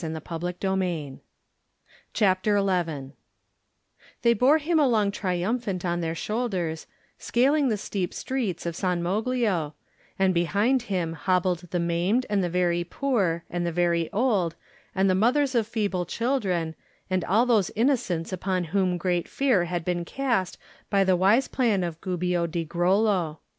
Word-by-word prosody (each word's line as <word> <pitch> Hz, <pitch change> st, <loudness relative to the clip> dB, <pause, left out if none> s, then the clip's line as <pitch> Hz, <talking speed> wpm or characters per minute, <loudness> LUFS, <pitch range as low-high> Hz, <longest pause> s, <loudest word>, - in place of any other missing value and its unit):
Digitized 165 Hz, +2 st, -4 dB
by 190 Hz, -1 st, 0 dB
Google 170 Hz, -8 st, -3 dB, 0.9 s
CHAPTER 205 Hz, 0 st, +2 dB
XI 170 Hz, -8 st, -1 dB, 1.1 s
THEY 235 Hz, -, +5 dB
bore 255 Hz, +7 st, +4 dB
him 320 Hz, +2 st, +1 dB
along 225 Hz, -8 st, +3 dB
triumphant 190 Hz, +1 st, -2 dB
on 175 Hz, 0 st, -1 dB
their 165 Hz, 0 st, -2 dB
shoulders, 185 Hz, -6 st, -2 dB, 0.3 s
scaling 275 Hz, +3 st, +2 dB
the 215 Hz, -, 0 dB
steep 190 Hz, -3 st, -3 dB
streets 225 Hz, -12 st, -3 dB
of 170 Hz, -1 st, -3 dB
San 180 Hz, -1 st, -1 dB
Moglio, 200 Hz, -5 st, 0 dB, 0.4 s
and 190 Hz, -1 st, +3 dB
behind 205 Hz, +9 st, +2 dB
him 175 Hz, -4 st, -1 dB
hobbled 180 Hz, +2 st, 0 dB
the 175 Hz, -, -1 dB
maimed 175 Hz, +9 st, +1 dB
and 200 Hz, -2 st, +2 dB
the 175 Hz, -, -1 dB
very 175 Hz, 0 st, +1 dB
poor, 185 Hz, -5 st, -1 dB
and 175 Hz, 0 st, -3 dB
the 170 Hz, -, -1 dB
very 170 Hz, -1 st, +1 dB
old, 205 Hz, -7 st, +1 dB, 0.4 s
and 190 Hz, 0 st, +3 dB
the 185 Hz, -, +3 dB
mothers 255 Hz, +8 st, +2 dB
of 230 Hz, -3 st, +1 dB
feeble 200 Hz, -6 st, -1 dB
children, 195 Hz, -11 st, -1 dB, 0.3 s
and 185 Hz, -2 st, 0 dB
all 220 Hz, +7 st, +3 dB
those 225 Hz, -6 st, +2 dB
innocents 215 Hz, -9 st, 0 dB
upon 185 Hz, 0 st, -1 dB
whom 185 Hz, -3 st, +2 dB
great 175 Hz, -1 st, -1 dB
fear 245 Hz, -11 st, +2 dB
had 175 Hz, -1 st, -3 dB
been 175 Hz, -1 st, -1 dB
cast 235 Hz, -3 st, -1 dB, 0.3 s
by 195 Hz, -1 st, +3 dB
the 190 Hz, -1 st, +3 dB
wise 200 Hz, +9 st, +3 dB
plan 225 Hz, -8 st, +1 dB
of 170 Hz, -2 st, -5 dB
Gubbio 180 Hz, -2 st, -1 dB
di 165 Hz, 0 st, -3 dB
Grollo. 180 Hz, -1 st, +1 dB
185 Hz, 150 wpm, -26 LUFS, 175-220 Hz, 1.1 s, THEY